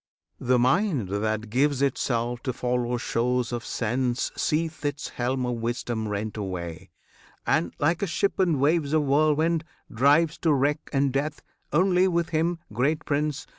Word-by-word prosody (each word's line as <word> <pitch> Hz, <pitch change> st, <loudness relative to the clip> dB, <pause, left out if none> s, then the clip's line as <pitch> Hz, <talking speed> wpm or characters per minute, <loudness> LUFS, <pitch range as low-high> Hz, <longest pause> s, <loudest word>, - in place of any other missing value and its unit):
The 125 Hz, 0 st, +2 dB
mind 130 Hz, -, +2 dB
That 110 Hz, +2 st, -2 dB
gives 140 Hz, +2 st, +2 dB
itself 120 Hz, -3 st, -1 dB
to 130 Hz, -, -2 dB
follow 125 Hz, 0 st, -1 dB
shows 125 Hz, +1 st, 0 dB
of 120 Hz, -1 st, -3 dB
sense 125 Hz, +2 st, -1 dB
Seeth 160 Hz, 0 st, -1 dB
its 145 Hz, -1 st, -3 dB
helm 125 Hz, +1 st, -1 dB
of 125 Hz, -1 st, -2 dB
wisdom 115 Hz, -1 st, -2 dB
rent 105 Hz, +1 st, -3 dB
away, 90 Hz, -5 st, -5 dB, 0.6 s
And, 85 Hz, 0 st, +1 dB
like 170 Hz, +4 st, +1 dB
a 200 Hz, -, 0 dB
ship 195 Hz, +4 st, 0 dB
in 170 Hz, -7 st, +2 dB
waves 150 Hz, +1 st, +2 dB
of 155 Hz, -1 st, +3 dB
whirlwind, 155 Hz, +3 st, +2 dB, 0.3 s
drives 150 Hz, +7 st, +3 dB
To 160 Hz, -3 st, +2 dB
wreck 145 Hz, +2 st, +1 dB
and 140 Hz, -2 st, +1 dB
death. 145 Hz, +2 st, -2 dB, 0.3 s
Only 180 Hz, +3 st, +3 dB
with 170 Hz, -2 st, 0 dB
him, 165 Hz, +2 st, 0 dB, 0.2 s
great 150 Hz, +8 st, 0 dB
Prince! 150 Hz, 0 st, -1 dB
135 Hz, 155 wpm, -26 LUFS, 120-155 Hz, 0.6 s, of